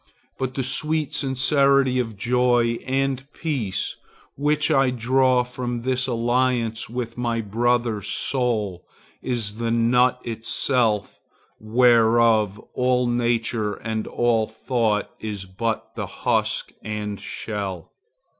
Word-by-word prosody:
But 130 -1 -2
the 135 - -1
sweet 155 +3 0
sincerity 135 -1 +2
of 115 -4 -3
joy 120 +1 +2
and 135 +1 -1
peace 115 - -2 0.4
which 150 +2 +1
I 135 -3 +4
draw 125 +1 +2
from 120 -1 -4
this 130 0 0
alliance 120 -1 0
with 120 0 -5
my 120 -1 0
brother's 115 0 0
soul 110 -9 -1 0.4
is 115 -4 -3
the 115 0 -1
nut 120 +2 +3
itself 115 -2 0 0.4
whereof 115 -2 +4 0.2
all 125 0 +2
nature 115 -3 0
and 110 0 -4
all 115 -2 +1
thought 110 -2 -1
is 105 -3 -5
but 110 +4 -3
the - - -4
husk - - -1
and 105 -1 -4
shell. 100 -5 -5
120 Hz, 110 wpm, -23 LUFS, 110-130 Hz, 0.4 s, I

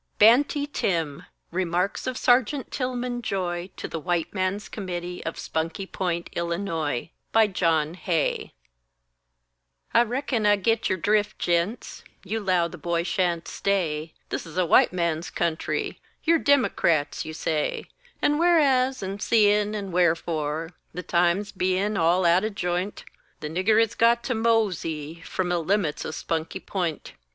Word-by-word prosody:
BANTY 270 +6 +5
TIM 165 - -2 0.3
REMARKS 180 +4 -1
OF 255 -1 -2
SERGEANT 255 +2 +2
TILMON 250 -1 -2
JOY 180 -4 -2
TO - - -5
THE 165 - -5
WHITE 175 0 -1
MAN'S 190 +1 -1
COMMITTEE 180 -3 -5
OF 165 - -4
SPUNKY 165 +4 -3
POINT, 175 -3 -3
ILLINOIS 170 -6 -2 0.2
BY 225 -1 +5
JOHN 165 -5 +1
HAY 175 -3 -1 1.4
I - - +6
reckon 240 -2 0
I 205 - +6
git 225 +3 +1
your 190 - +1
drift, 210 +3 +1
gents, 175 +7 -1 0.2
You 210 +3 -2
'low 185 -4 +2
the 175 0 -11
boy 170 +2 0
sha'n't 175 -2 0
stay; 160 -6 -1
This - - -4
is 165 - -10
a 185 - +3
white - - +5
man's 170 -2 -1
country; 165 -2 -2 0.2
You're 330 0 +4
Dimocrats, 170 - +2
you 155 0 -7
say; 155 -2 -1 0.4
And 295 +1 +3
whereas, 270 - +3
and 195 +1 -5
seein', 210 -1 +3
and 195 -3 -5
wherefore, 160 -2 0 0.2
The 180 - -4
times 175 +4 +1
bein' 185 +3 0
all 175 +2 +3
out 175 +3 +4
o' 215 - 0
j'int, 180 -1 -3 0.4
The 150 - -5
nigger 195 +6 +3
has 225 -1 +2
got 235 +1 +3
to 250 - -1
mosey 180 -9 0
From 180 +1 -2
the 175 -1 +1
limits 170 -2 0
o' - - -3
Spunky 160 +1 -3
P'int! 175 -6 -3
185 Hz, 145 wpm, -25 LUFS, 170-215 Hz, 1.4 s, I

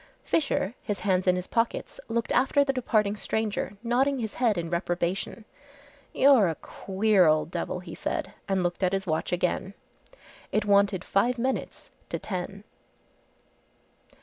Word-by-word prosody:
Fisher, 275 - 0
his 205 - -3
hands 185 -2 +1
in 180 - +5
his 180 0 -3
pockets, 230 +2 -1
looked 230 -1 -1
after 280 +2 +4
the 275 -1 0
departing 215 -5 +1
stranger, 210 -1 -2
nodding 265 +4 +2
his 220 -4 -3
head 230 -6 +1
in 170 -1 -2
reprobation. 175 +5 -2 0.7
"You're 265 -7 +5
a 160 - -2
queer 195 0 +2
old 155 +1 +2
devil," 180 - -3
he 175 -2 -9
said, 190 - -3 0.2
and 190 -2 +1
looked 175 +1 -2
at 185 0 +2
his 195 0 -1
watch 160 -3 -1
again. 180 +2 -1 0.8
It 215 - +1
wanted 200 -2 +3
five 240 +6 +2
minutes 260 +3 -3 0.2
to - - -2
ten. 195 +1 -5
200 Hz, 150 wpm, -27 LUFS, 180-230 Hz, 0.8 s, in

